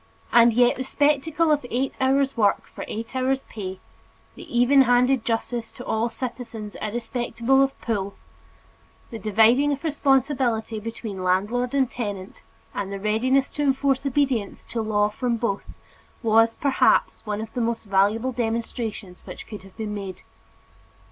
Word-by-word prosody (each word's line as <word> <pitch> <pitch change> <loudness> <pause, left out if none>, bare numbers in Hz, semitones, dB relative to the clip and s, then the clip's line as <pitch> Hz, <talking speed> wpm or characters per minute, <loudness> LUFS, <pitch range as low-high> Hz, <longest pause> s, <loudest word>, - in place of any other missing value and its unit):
And 235 0 +7
yet 245 +2 +3
the 260 - -2
spectacle 300 +4 +1
of 295 -2 +2
eight 260 +3 -1
hours' 270 +1 +2
work 210 -4 +2
for - - -9
eight 225 +4 -6
hours' 260 +1 0
pay, 190 -3 -7 0.5
the - - -12
even 265 +3 +6
handed 250 0 +3
justice 230 0 -2
to 250 - -10
all 225 +2 0
citizens 230 -3 -6
irrespective 235 +1 -4
of 270 0 +4
"pull," 200 -4 -2 1.0
the 225 - -6
dividing 225 +7 +4
of 280 - -6
responsibility 265 -7 +1
between 215 -3 -6
landlord 215 +8 0
and 270 -2 +3
tenant, 205 -6 -6 0.3
and 200 -1 -4
the 200 - -4
readiness 250 +6 +1
to 295 - -4
enforce 270 -1 +1
obedience 270 -6 0
to 230 - -3
law 210 -1 +2
from 235 +3 -2
both, 210 -4 -2 0.5
was, 225 0 +4
perhaps, 280 -2 +2
one 210 0 -2
of 220 0 -7
the 245 - -2
most 230 0 -1
valuable 205 +5 +2
demonstrations 225 -5 -3
which - - -9
could 210 -3 -9
have 195 +1 -17
been 215 -2 -4
made. 195 -3 -6
235 Hz, 150 wpm, -24 LUFS, 215-265 Hz, 1.0 s, And